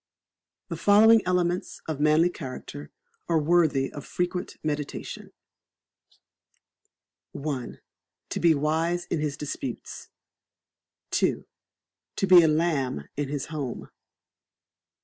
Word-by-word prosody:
The - - -4
following 220 +2 +6
elements 180 0 0
of 155 -3 -3
manly 155 +4 +4
character 145 -1 -8 0.4
are 165 - +3
worthy 155 -4 +2
of 145 - -7
frequent 180 0 -3
meditation: 150 -2 -4 2.1
i. 140 -4 -3 0.6
To - - -2
be 165 -1 +4
wise 160 +4 0
in 165 - 0
his 150 -2 -2
disputes. 135 -4 -6 1.1
ii. - - +1 0.7
To - - 0
be 185 -2 +8
a 160 - +4
lamb 150 - 0
in 145 -1 -2
his 145 -2 -3
home. 140 -6 -5
155 Hz, 105 wpm, -26 LUFS, 145-175 Hz, 2.1 s, be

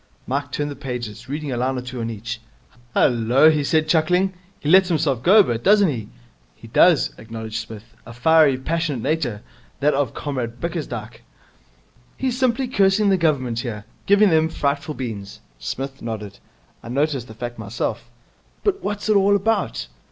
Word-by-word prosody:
Mike 140 +2 -2
turned 145 0 -2
the - - -6
pages, 120 -4 -6
reading 150 0 -3
a 125 - -2
line 130 +2 0
or - - -3
two 125 -1 -6
on 115 - -2
each. 115 +1 -6 0.5
'Hullo!' 125 +6 +4
he 150 -2 0
said, 155 +2 +1
chuckling. 180 +4 +2 0.3
'He - - -6
lets 185 +3 +6
himself 150 -7 +1
go 190 - +5
a 210 - +9
bit, 120 -7 -3
doesn't 205 -2 +5
he!' 115 -7 -4 0.5
'He - - -14
does,' - - +4
acknowledged 110 0 -6
Psmith. 110 -2 -9 0.2
'A 115 - -9
fiery, 150 +2 +4
passionate 150 -3 -2
nature, 130 -10 -1 0.4
that 145 +2 +3
of 135 -4 -1
Comrade 125 -5 -4
Bickersdyke.' 120 -10 -5 1.0
'He's 260 -2 -1
simply 255 0 +1
cursing 200 -2 +3
the 195 - +4
Government 135 -8 0
here. 110 -4 -5 0.2
Giving 200 0 +5
them 160 0 +3
frightful 145 0 -2
beans.' 105 -6 -6 0.2
Psmith 135 - -5
nodded. 110 -3 -6 0.4
'I - - -10
noticed 135 -1 -1
the 110 - -11
fact 120 +1 -6
myself.' 110 +2 -4 0.5
'But 395 -1 0
what's 205 +1 -3
it 215 - +3
all 200 0 +4
about?' 200 - 0
140 Hz, 170 wpm, -22 LUFS, 115-165 Hz, 1.0 s, a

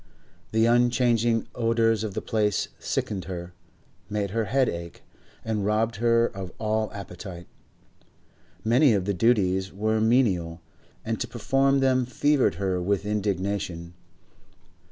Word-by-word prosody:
The 110 0 +3
unchanging 120 -1 +2
odours 115 -2 +1
of 105 -3 -4
the - - -3
place 105 -3 0
sickened 95 -3 -3
her, 90 -1 -6 0.6
made 105 -2 -2
her 115 +1 0
head 130 +4 +2
ache, 85 0 -6 0.4
and 110 -2 -1
robbed 110 +1 0
her 115 +1 +3
of 95 -5 -6
all 110 -1 -1
appetite. 90 -2 -8 1.2
Many 120 +3 +4
of 95 -3 0
the 100 - 0
duties 95 -2 +2
were 110 +2 0
menial, 100 -8 +2 0.5
and - - -2
to - - -2
perform 135 0 +1
them 130 -2 +2
fevered 135 - +2
her 95 -1 -1
with 100 +2 0
indignation. 100 -4 -2
105 Hz, 130 wpm, -26 LUFS, 95-115 Hz, 1.2 s, Many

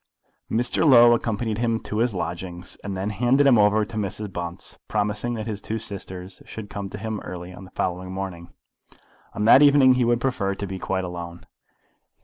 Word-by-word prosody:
Mr. 120 +6 0
Low 120 -5 +8
accompanied 115 -1 -1
him 115 -1 +1
to 105 - -4
his 115 -3 +1
lodgings, 90 +1 -5
and 100 -2 -4
then 100 +3 -2
handed 125 +7 +3
him 125 -5 +6
over 105 +1 +4
to 110 - -8
Mrs. 105 -1 -4
Bunce, 85 0 -6
promising 105 +3 -1
that 110 -1 -4
his 105 -3 -5
two 110 - -3
sisters 95 -4 -7
should 110 -2 -9
come 100 -1 -5
to 105 - -7
him 110 0 -4
early 90 0 -8
on 90 +1 -11
the 95 - -16
following 90 +1 -2
morning. 95 -3 -6 0.8
On 105 - -1
that 130 +5 +8
evening 140 -3 +7
he 125 -1 +2
would 120 0 +2
prefer 115 -7 -1
to 100 - -4
be 95 -1 -6
quite 95 0 -2
alone. 85 -1 -7
105 Hz, 190 wpm, -24 LUFS, 95-115 Hz, 0.8 s, Low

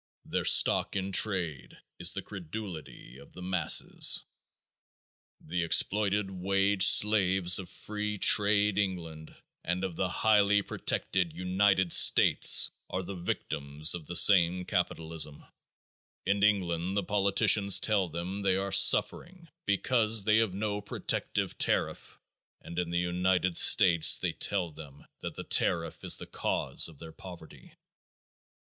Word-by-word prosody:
Their - - -4
stock - - +3
in 95 0 -4
trade 90 -8 -2 0.2
is 90 +1 +3
the 100 -1 -7
credulity 85 - -10
of 70 - -18
the 90 - -12
masses. 90 -1 +1 1.2
The 85 +3 -5
exploited 100 +3 0
wage 95 +1 +1
slaves 95 -3 +4
of 90 -2 -10
free 105 +2 -6
trade 105 0 +2
England 85 -5 -6 0.3
and 90 +2 -4
of 95 -3 -5
the 95 - -2
highly 105 0 +1
protected 90 -4 -4
United 95 0 0
States - - +5 0.2
are 95 +1 -5
the 100 - -8
victims 75 -4 -2
of 80 -4 -9
the 90 - -7
same 90 -1 +3
capitalism; 80 -4 -4 0.8
in 100 +1 -1
England 95 -3 -1
the 100 - -1
politicians 100 0 +2
tell 100 -4 0
them 85 +5 -7
they 95 -2 0
are 100 +1 -4
suffering 165 - +2 0.2
because 110 +1 0
they 110 +1 +2
have 110 -5 -1
no 105 0 -4
protective 100 - -4
tariff - - -2 0.4
and 85 - -8
in 90 -1 -4
the 85 - -3
United 90 0 -1
States 85 -2 +5
they - - -3
tell 90 -5 -2
them 75 -1 -14 0.2
that - - -8
the - - -8
tariff 85 -2 -1
is - - +2
the - - -9
cause - - -2
of 80 - -17
their 80 +1 -12
poverty. 85 -4 -15
95 Hz, 135 wpm, -28 LUFS, 85-100 Hz, 1.2 s, States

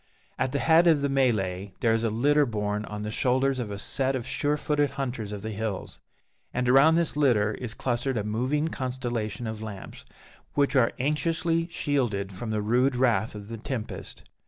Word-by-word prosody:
At 130 0 0
the 140 - 0
head 160 +5 +5
of 155 -4 +4
the 140 - +1
melée 100 -8 0
there 115 -1 +3
is 115 0 0
a 115 - +2
litter 145 +6 +3
borne 105 -1 -2
on 105 0 -6
the 105 - -3
shoulders 130 +3 +1
of 115 -4 -3
a 100 - -5
set 135 +6 +1
of 120 -3 -3
sure 145 +3 0
footed 145 -1 +1
hunters 120 -6 -3
of 105 -1 -6
the 110 - -4
hills; 105 -2 -4 0.5
and 125 0 -1
around 135 +6 +6
this 170 -2 +1
litter 115 -8 +3
is 120 -2 -6
clustered 125 0 -1
a 105 - -1
moving 130 +9 0
constellation 125 -4 -3
of 110 -1 -5
lamps, 105 -3 -8 0.5
which 140 -1 +2
are 125 -3 +4
anxiously 165 +4 0
shielded 120 - -1
from 110 +5 -6
the 105 -1 -1
rude 125 +4 +2
wrath 120 -4 +1
of 100 -1 -8
the 115 +1 -6
tempest. 115 -1 -6
125 Hz, 190 wpm, -27 LUFS, 110-140 Hz, 0.5 s, around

